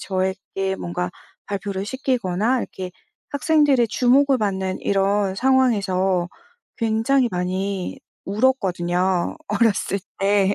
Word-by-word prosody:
저에게 190 0 -2
뭔가 180 0 -3 0.4
발표를 200 -1 -3
시키거나 240 -2 0
이렇게 185 -1 -6 0.4
학생들의 285 -3 +3
주목을 260 +3 +3
받는 190 -3 -1
이런 200 0 +1
상황에서 195 -8 +2 0.5
굉장히 230 +3 +2
많이 185 +1 -2 0.3
울었거든요, 190 - +1
어렸을 215 -3 +1 0.2
때 200 0 +3
200 Hz, 250 characters per minute, -22 LUFS, 190-245 Hz, 0.5 s, 학생들의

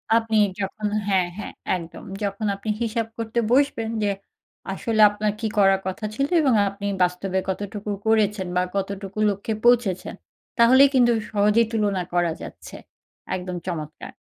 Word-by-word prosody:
আপনি 225 -1 +2 0.2
যখন 210 +2 -3 0.2
হ্যাঁ, 185 -3 +2
হ্যাঁ 205 - -6 0.2
একদম। 170 -1 -10 0.2
যখন 200 +2 -2
আপনি 205 +2 -7
হিসাব 230 0 -1
করতে 230 +1 -2
বসবেন 255 -5 +2
যে, 205 - +2 0.6
আসলে 220 +2 0
আপনার 210 0 -1
কি 225 - -1
করার 195 -1 +5
কথা 190 +3 -4
ছিল 275 +2 0
এবং 265 -5 +3 0.2
আপনি 200 +1 -8 0.2
বাস্তবে 180 +1 -1
কতটুকু 205 +2 -4 0.2
করেছেন 210 -3 +2
বা 180 - +3
কতটুকু 195 +1 -4
লক্ষ্যে 200 +2 -3
পৌঁছেছেন, 230 -7 +2 0.4
তাহলেই 260 +4 +7
কিন্তু 240 -2 +5 0.2
সহজেই 210 +2 +3
তুলনা 205 -4 0
করা 175 -2 +2
যাচ্ছে। - - -10 0.6
একদম 180 0 -5
চমৎকার। 155 -4 -6
205 Hz, 145 wpm, -23 LUFS, 190-225 Hz, 0.6 s, তাহলেই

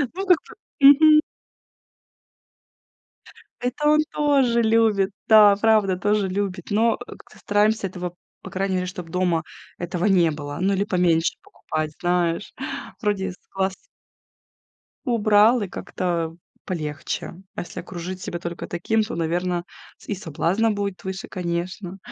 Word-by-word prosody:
Ну, 385 - -3
как 360 -3 +6 0.4
бы. 275 - +9
Мгм. 305 +1 +6 2.4
Это 250 +5 -1
он 305 0 +5
тоже 270 -5 +2
любит. 220 -3 +3 0.2
Да, 210 -2 +8
правда, 210 -4 +3
тоже 205 +1 +1
любит, 190 -2 -3
но, 225 +2 +3
э, 245 - -11
как-то - - -18
стараемся 210 0 +1
этого, 180 -1 -6 0.3
по - - -9
крайней 190 0 -1
мере, 180 0 -1
чтоб 180 -2 -7
дома 175 -2 0 0.3
этого 175 +2 -3
не 175 -5 +4
было. 145 0 -6
Ну, 195 +1 +2
или 200 +1 0
поменьше 175 -4 +2
покупать, 155 -1 -4
знаешь, 175 0 0 0.5
вроде 205 -3 0
с - - -19 0.2
глаз 190 0 0 1.3
убрал, 220 0 +4
и 200 - -2
как-то 170 -3 -3 0.3
полегче. 155 -2 -4 0.2
А - - -3
если 175 - -8
окружить 180 +1 -7
себя 175 - -4
только 170 0 -6
таким, 220 +6 0
то, 215 +3 -3
наверно, 175 +1 -1 0.3
с - - -19
и - - -1
соблазна 185 +5 0
будет 200 -2 -3
выше, 190 0 -5
конечно. 180 +1 -4
190 Hz, 140 wpm, -23 LUFS, 175-215 Hz, 2.4 s, бы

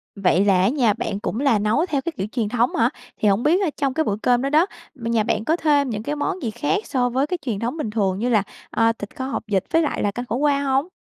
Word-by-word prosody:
Vậy 195 0 +2
là 190 -2 +4
ở 195 - +4
nhà 240 -6 +2
bạn 200 - -3
cũng 215 - -3
là 270 -7 +3
nấu 215 - +1
theo 290 -6 -1
cái 335 - -3
kiểu 195 - -2
truyền 225 -5 -1
thống 240 +1 +1
hả? 230 +1 +3 0.3
Thì 210 - +1
hổng 200 +4 +2
biết 345 +6 +3
là 370 - +1
trong 275 -2 0
cái 315 - +1
bữa 200 - -1
cơm 245 -1 +3
đó 275 - -1
đó, 315 +4 +4 0.3
nhà 230 -3 0
bạn 215 0 -1
có 320 - +2
thêm 290 -4 +2
những 215 -2 -4
cái 295 +3 -2
món 375 +6 -2
gì 225 - -1
khác 290 - -1
so 250 -3 0
với 265 +4 0
cái 360 - -2
truyền 220 -6 -2
thống 240 +7 -3
bình 275 -8 -3
thường 200 -3 0
như 240 +3 0
là, 215 -5 +3 0.3
ờ, 225 0 +3
thịt 205 - -8
kho 260 - -4
hột 270 - -3
vịt 195 -3 +1
với 330 - +5
lại 300 - -1
là 205 - +1
canh 245 +4 -5
khổ 230 - -3
qua 280 +1 +2
hông? 275 +3 +1
245 Hz, 295 wpm, -22 LUFS, 215-290 Hz, 0.3 s, với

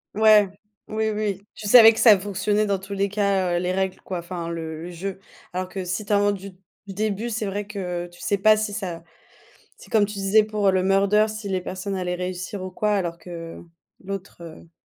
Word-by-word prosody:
Ouais, 215 -2 +6 0.4
oui, 220 0 -1
oui. 210 -2 -2
Tu 210 - -7
savais 225 0 +9
que - - -5
ça 215 -5 +8
fonctionnait 205 +2 0
dans 200 -2 0
tous 200 +1 -8
les 200 0 0
cas, 195 -3 +1
heu, - - +1
les 180 0 -1
règles, 190 -1 -1
quoi, 185 -2 -5
enfin 170 -1 -6
le 160 -1 -5
le 175 - -6
jeu, 190 +3 -5 0.3
alors 185 0 -2
que 190 -1 -5
si 180 +4 -3
tu 205 - -1
inventes 205 0 +3
du 195 +1 -9 0.4
du 195 - -7
début, 215 +3 -2
c'est 220 -1 -2
vrai 200 +1 -3
que 180 -4 -4
tu 175 0 -17
sais 200 - 0
pas 215 +2 +5
si 215 -1 -2
ça 175 -6 -5 0.7
c'est - - -16
comme 210 -2 +4
tu 210 - -8
disais 200 +2 +3
pour 210 -2 +1
le 185 -1 +1
murder, 200 +3 +3
si 215 -1 -6
les 190 -1 -1
personnes 190 +2 -5
allaient 180 -1 -2
réussir 180 +2 -5
ou 185 - -5
quoi 210 +3 0
alors 170 -3 -2
que 165 -1 -9 0.4
l'autre, 195 -2 -7
heu 165 0 -12
195 Hz, 220 wpm, -23 LUFS, 180-210 Hz, 0.7 s, savais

